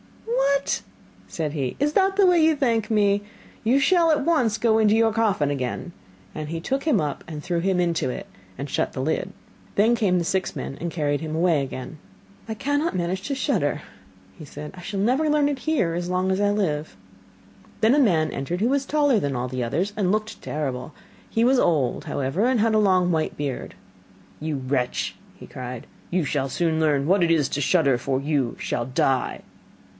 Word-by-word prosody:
'What!' 280 - +1 0.5
said 155 -3 -3
he, 135 -5 -2
'is 295 +1 +1
that 390 +1 +3
the 400 -1 +5
way 350 -3 +5
you 320 0 +4
thank 230 -6 0
me? 205 -1 +3 0.4
You 245 +5 +3
shall 335 +2 +4
at 295 -2 +1
once 255 -11 +2
go 220 0 +3
into 215 -1 +4
your 225 -1 +3
coffin 205 -10 +1
again,' 135 +5 -3 0.4
and 155 -1 -5
he 165 +1 -3
took 270 +11 -2
him 295 -10 +2
up, 150 -3 -3 0.2
threw 170 +2 -1
him 185 +1 +1
into 170 -6 0
it, - - -5 0.3
and 140 - -5
shut - - -1
the - - -5
lid. 160 +6 -1 0.4
Then 225 +4 +4
came 195 -6 +2
the 170 - 0
six 190 +2 -1
men 135 - -5
and 170 0 -3
carried 145 -3 -1
him 155 -1 -4
away 165 -3 +2
again. 130 +2 -6 0.5
'I 220 - -2
cannot 285 +7 -1
manage 180 +1 -1
to 275 - -1
shudder,' - - 0 0.6
said 150 +1 -8
he. - - -11
'I - - -9
shall 195 +2 -4
never 260 +9 +2
learn 295 -1 +3
it 285 -2 -2
here 255 - 0
as 175 +1 -3
long 185 +1 0
as 190 +2 0
I 205 - +3
live.' 155 - -1 0.8
Then 225 +4 +5
a - - +4
man 170 - +3
entered 155 +6 -3
who 225 +4 +2
was 275 0 +1
taller 290 -5 +3
than 140 -6 -2
all 125 +1 -2
others, 180 - -1
and 190 -4 +1
looked 215 +1 -2
terrible. 140 -2 -4 0.4
He 225 - +1
was 255 +1 +4
old, 145 - +1
however, 140 - -1
and 255 -1 +2
had 225 +1 +2
a 215 - +4
long 185 -3 +3
white 160 -2 -1
beard. 140 -3 -4 0.6
'You 155 -1 -2
wretch,' 130 -1 -1 0.3
cried 125 -1 -7 0.2
he, 180 - -1
'you 170 - +1
shall 135 -1 -1
soon 160 +1 0
learn 145 -3 +2
what 190 +1 +4
it 170 - +2
is 155 -5 +3
to 145 - -2
shudder, 140 -3 +3
for 130 +2 -1
you 140 -3 -1
shall 120 - -2
die. 130 +1 0
180 Hz, 200 wpm, -24 LUFS, 150-230 Hz, 0.8 s, the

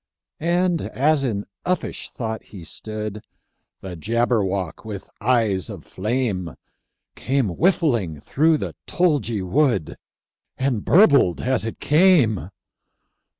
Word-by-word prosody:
And 175 +1 +1
as 145 +1 +1
in 105 -6 -2 0.2
uffish 180 +1 -2
thought 110 -2 -5
he 95 -5 -11
stood, 105 +4 -6 0.6
The 95 -2 -7
Jabberwock, 100 -2 -1
with 105 -3 -8
eyes 110 -5 +1
of - - -9
flame, 100 - -2 0.6
Came 130 -3 0
whiffling 120 - +1
through 155 - +2
the - - -5
tulgey 135 - +1
wood, 120 - +1 0.6
And 130 -5 0
burbled 145 - +5
as 125 -2 0
it 115 - -5
came! 145 - +3
115 Hz, 105 wpm, -22 LUFS, 100-145 Hz, 0.6 s, burbled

